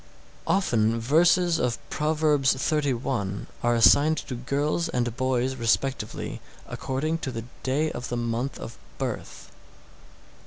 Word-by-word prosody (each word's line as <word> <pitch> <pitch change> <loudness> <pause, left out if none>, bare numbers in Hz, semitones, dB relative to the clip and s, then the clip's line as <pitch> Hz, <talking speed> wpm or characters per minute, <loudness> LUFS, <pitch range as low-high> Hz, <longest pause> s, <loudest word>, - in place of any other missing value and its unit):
695. 115 - +2
Often - - -2
verses 170 +6 +3
of 125 -1 -2
Proverbs 150 -3 +2
xxxi. 130 -8 -1 0.2
are 120 0 +2
assigned 145 +7 +5
to 135 - -5
girls 145 +7 -1
and 120 -5 -1
boys 130 0 0
respectively 120 -1 -1 0.3
according 155 +5 -2
to 140 - -4
the 115 -1 -6 0.2
day 150 +4 0
of 125 - -6
the 120 - -2
month 120 +3 -2
of - - -7
the - - -18 0.3
birth. - - -7
130 Hz, 130 wpm, -26 LUFS, 120-150 Hz, 0.3 s, assigned